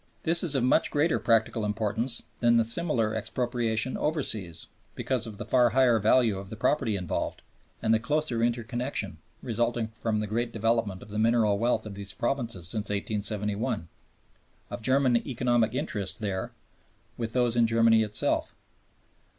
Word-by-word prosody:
This 170 +1 +6
is 155 -5 +2
of 130 - +1
much 125 - +3
greater 150 +3 +1
practical 115 -1 +1
importance 110 +3 -1 0.2
than 120 -1 +4
the 115 - +3
similar 115 -4 +1
expropriation 115 +1 -1
overseas 110 - -1 0.3
because 125 -3 -1
of 105 -2 -8
the 120 - -6
far 125 -2 +4
higher 125 -1 +3
value 110 -1 +3
of 95 0 -9
the 110 - -7
property 110 -1 0
involved 90 -3 -3 0.4
and 110 -1 +3
the 110 - +3
closer 145 -1 -1
interconnection, 120 - -2 0.2
resulting 120 -1 -1
from 110 -1 -2
the 105 - -2
great 115 +3 -2
development 115 -4 -1
of - - -14
the 105 +1 -4
mineral 110 -2 +2
wealth 115 -1 0
of 105 - -7
these 100 0 -6
provinces 115 -9 -2
since 105 +3 -3
1871, 105 -2 -2 0.8
of - - -5
German 130 0 +3
economic 120 -2 0
interests 110 - -2
there 100 -4 -3 0.6
with 115 -1 -5
those 120 -2 +1
in 120 -1 +4
Germany 115 0 +4
itself. 105 -1 0
115 Hz, 155 wpm, -27 LUFS, 105-120 Hz, 0.8 s, This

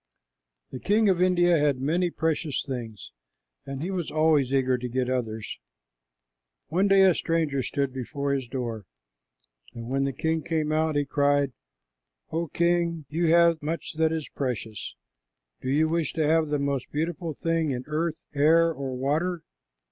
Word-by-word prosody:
The 130 - -6
king 210 - +3
of 180 -2 +2
India 175 -2 +4
had 145 -3 +2
many 170 +6 +1
precious 160 -3 -1
things, 115 - -6 0.6
and 135 +1 -5
he 185 - -3
was 180 -4 -3
always 155 -4 +2
eager 130 -2 +2
to 125 0 -4
get 125 +1 -1
others. 115 -4 -3 1.1
One 185 +6 +2
day 195 -1 +6
a 190 -2 +6
stranger 160 -5 0
stood 140 0 -2
before 140 +2 -3
his 135 -3 -2
door, 115 -5 -4 0.9
and 115 0 -7
when 135 0 +1
the 140 - 0
king 160 +4 -1
came 155 -1 -1
out 155 0 +1
he 145 0 +1
cried, 145 -1 +1 0.8
"O 165 +1 -1
king, 170 -1 0
you 165 +3 0
have 170 0 +4
much 155 +1 -4
that 160 0 +1
is 160 -2 -3
precious. 115 - -4 0.7
Do 130 - -3
you 155 +4 +3
wish 165 -2 -1
to 160 -2 0
have 160 +1 +3
the 150 0 0
most 140 -2 -2
beautiful 160 +1 -3
thing 165 -1 0
in 125 -2 -3
earth, 155 +2 -2
air, 165 +3 +4
or 135 -2 -5
water?" 160 +6 -1
150 Hz, 165 wpm, -26 LUFS, 135-165 Hz, 1.1 s, day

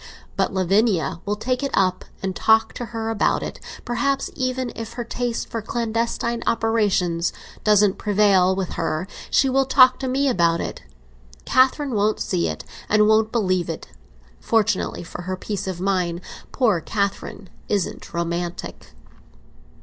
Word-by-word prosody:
But - - +1
Lavinia 190 -4 +1
will 205 - +1
take 250 +5 -2
it 275 - -1
up, 185 -1 +1 0.2
and 190 -1 -2
talk 220 0 +3
to 240 - -5
her 225 -1 -4
about 220 - +1
it; - - -6 0.3
perhaps, 275 +3 0
even, 255 -1 -2
if 225 0 -6
her 240 0 -4
taste 240 0 -3
for 230 - -4
clandestine 230 +1 -2
operations 200 -7 +1 0.3
doesn't 210 -2 +4
prevail 195 -3 +3
with 190 -2 -2
her, 165 +1 -2 0.2
she 275 - +3
will 270 0 +2
talk 255 -1 +6
to 265 - -3
me 270 +2 +1
about 170 -8 +2
it. - - -5 0.6
Catherine 265 +1 +3
won't 210 0 +1
see 85 -1 0
it, 80 -1 -5 0.2
and 210 0 +4
won't 220 0 +3
believe 185 -7 0
it, 165 - -6 0.5
fortunately 215 -5 0
for 175 - -8
her 185 +1 -4
peace 200 0 -4
of 185 -2 -4
mind; 180 -2 0 0.3
poor 220 -10 +2
Catherine 200 0 -3 0.2
isn't 200 -4 -2
romantic." 170 +1 -4
210 Hz, 150 wpm, -22 LUFS, 185-235 Hz, 0.6 s, talk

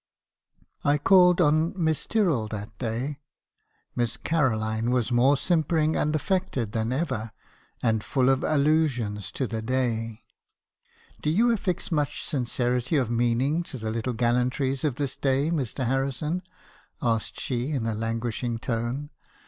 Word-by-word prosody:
"I 145 +1 +3
called 180 +3 +5
on 155 +4 +3
Miss 160 -3 0
Tyrrell 170 - +1
that 105 0 -6
day. 125 +5 -3 0.8
Miss 120 -1 -1
Caroline 115 -6 0
was 125 -2 +1
more 130 +4 +4
simpering 160 0 +1
and 150 +1 +1
affected 155 - -1
than 110 +1 -1
ever; 130 -6 -2 0.5
and 110 -3 +2
full 130 -2 +2
of 135 0 +2
allusions 140 - +1
to 135 - -1
the 115 -2 -3
day. 115 -2 -1 1.0
"'Do 150 - 0
you 225 +9 +4
affix 185 -7 -2
much 150 -4 -1
sincerity 125 0 -1
of 130 -5 +1
meaning 120 +7 +1
to 155 -6 -8
the 110 -2 -3
little 115 +2 -2
gal 120 +1 +2
lantries 130 +2 0
of 145 -5 0
this 140 -2 -3
day, 140 +3 +1
Mr. 135 -4 -2
Harrison?' 135 +6 -1 0.6
asked 115 -2 -1
she 125 +1 -2
in 135 -7 -1
a 115 - 0
languishing 115 +2 -2
tone. 120 +5 -3
130 Hz, 140 wpm, -26 LUFS, 115-150 Hz, 1.0 s, called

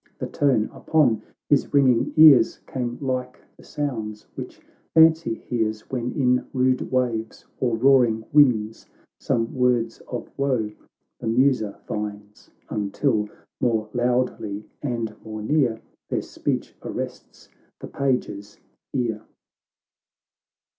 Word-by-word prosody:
The - - -4
tone 130 -7 +1
upon 125 -9 +2 0.3
his 145 0 +2
ringing 130 -4 +4
ears 140 -8 +7
Came 120 -2 -4
like 130 -2 -3 0.2
the - - -18
sounds 110 -8 -4
which - - -8 0.4
fancy 160 -6 +5
hears, 110 -2 -2
"When 125 -2 -2
in 125 -3 +1
rude 130 -1 +1
waves 120 -3 -1
or 120 -3 +1
roaring 120 -3 +4
winds 115 -7 +3 0.3
Some 115 -1 -1
words 125 -3 +1
of 125 - -5
woe 130 -6 0 0.5
the - - -5
mtiser 115 -3 +2
finds, 105 -1 -6 0.2
Until 105 +1 0 0.3
more 110 -3 0
loudly 120 -4 -1 0.2
and 115 -6 -3
more 110 -1 -6
near, 125 -3 +1 0.3
Their - - -1
speech - - -3
arrests - - -7 0.3
the - - -7
page's 105 -7 -2 0.4
ear. 115 -5 -1
120 Hz, 115 wpm, -24 LUFS, 110-130 Hz, 0.5 s, ears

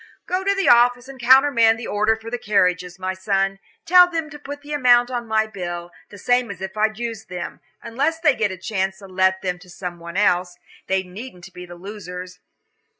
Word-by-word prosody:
"Go 370 +1 -1
to 395 +1 +1
the 390 -1 0
office 245 +1 +5
and 270 -1 -11
countermand 240 -2 +5
the 235 - -7
order 215 +2 +1
for 225 +1 -10
the 245 - -3
carriages, 180 -4 +1
my 185 0 -3
son; 195 0 -1 0.3
tell 360 +1 +7
them 325 -3 -3
to 295 - -10
put 290 0 -8
the 295 +1 -6
amount 245 -3 +4
on 240 -2 -3
my 220 0 +2
bill, 175 -4 -6 0.2
the 205 - -12
same 245 +4 +1
as 195 -3 -7
if 190 +1 -6
I'd 215 0 0
used 230 -2 -5
them, 180 -1 -6 0.2
unless 280 +8 -1
they 310 -4 +4
get 220 -5 0
a 185 - -6
chance 190 0 -2
to 195 - -13
let 190 0 +1
them 180 -1 -2
to 180 0 -17
some 175 -1 -7
one 170 +2 -7
else. 180 -3 +1 0.3
They 190 0 +1
needn't 185 -1 -11
be 180 0 -10
the 175 - -10
losers. 180 -1 -9
210 Hz, 210 wpm, -22 LUFS, 185-245 Hz, 0.3 s, tell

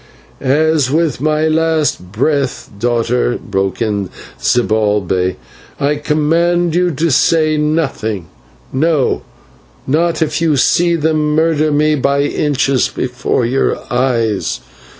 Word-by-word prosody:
"As 150 0 +2
with 155 -3 0
my 155 +1 +1
last 155 - 0
breath, 135 +4 -1
daughter," 120 +1 0
broke 95 +2 -2
in 100 -4 -2 0.3
Zibalbay, 105 -6 +1 0.4
"I 145 +1 +1
command 165 +3 +1
you 180 +1 +2
to 160 +1 -1
say 155 +3 +3
nothing, 150 - -1 0.5
no, 150 0 +1 0.6
not 165 +4 +1
if 160 +1 -2
you 160 -3 +2
see 170 +5 +3
them 155 -1 0
murder 155 -1 +2
me 150 +1 +2
by 140 0 +1
inches 140 -3 +1
before 125 -1 -2
your 130 +3 0 0.2
eyes." 115 - 0
145 Hz, 110 wpm, -15 LUFS, 120-155 Hz, 0.6 s, say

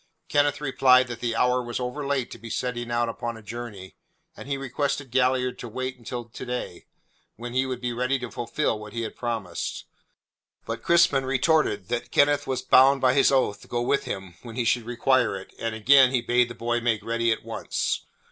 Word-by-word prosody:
Kenneth 145 0 +2
replied 130 -3 +4
that 120 -1 -6
the 120 -2 -2
hour 125 +2 +2
was 120 0 -4
overlate 135 +1 -2
to - - -9
be 115 - -9
setting 120 0 -3
out 120 0 +1
upon 115 0 -4
a 110 - -13
journey, 110 -4 -8 0.4
and - - -10
he 140 -1 -1
requested 135 0 -2
Galliard 125 0 +1
to 120 - -6
wait 130 +3 -4
until 120 0 -6
to 115 - -10
day, 125 -8 -5 0.5
when 120 +1 -7
he 130 +1 +1
would 130 -2 -4
be 125 -1 -3
ready 125 +3 0
to 125 -2 -7
fulfil 120 -1 -1
what 105 -1 -10
he 115 0 -3
had 110 - -6
promised. 115 -8 -4 0.8
But - - -4
Crispin 170 -5 +4
retorted 135 - +1
that 120 0 -2
Kenneth 145 0 +3
was 130 -1 -2
bound 135 +1 +6
by 130 -1 +3
his 135 0 +4
oath 115 -6 +1
to - - -15
go 120 0 -1
with 140 +3 +1
him 95 -2 -5
when 115 -2 -10
he 120 -1 -1
should 115 0 +1
require 120 -3 +2
it, 95 - -12
and 115 -1 -2
again 130 +4 +6
he 130 -1 +1
bade 120 0 +2
the 120 - -8
boy 120 +1 -1
make 110 -3 0
ready 115 0 +1
at 110 - -2
once. - - -2
125 Hz, 205 wpm, -25 LUFS, 115-130 Hz, 0.8 s, bound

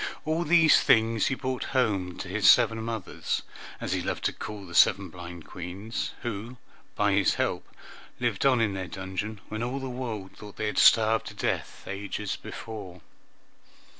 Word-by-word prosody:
All 160 +2 0
these, 165 -1 +6
things 115 -1 +3
he 130 - 0
brought 130 -1 -3
home 95 -8 +1
to - - -6
his 100 +1 +4
seven 115 -1 +5
mothers, 115 -3 -3 0.4
as - - -2
he - - 0
loved - - -3
to - - +1
call 105 -2 -7
the 85 - -11
seven 95 +2 +5
blind 85 -1 -9
Queens, 95 +5 -5
who 120 +1 -5 0.4
by 105 0 +2
his 100 0 +3
help - - -1 0.5
lived 120 -5 0
on 130 -3 +4
in 105 -3 +1
their 95 -1 -4
dungeon 95 +3 -5
when 110 +1 -4
all 125 +3 -2
the 135 - -5
world 115 -6 -5
thought 105 -1 -11
they 110 - -3
had 105 - 0
starved 110 0 +5
to - - -8
death - - -2
ages 100 +1 -4
before. 95 -6 -8
110 Hz, 170 wpm, -27 LUFS, 95-120 Hz, 0.5 s, these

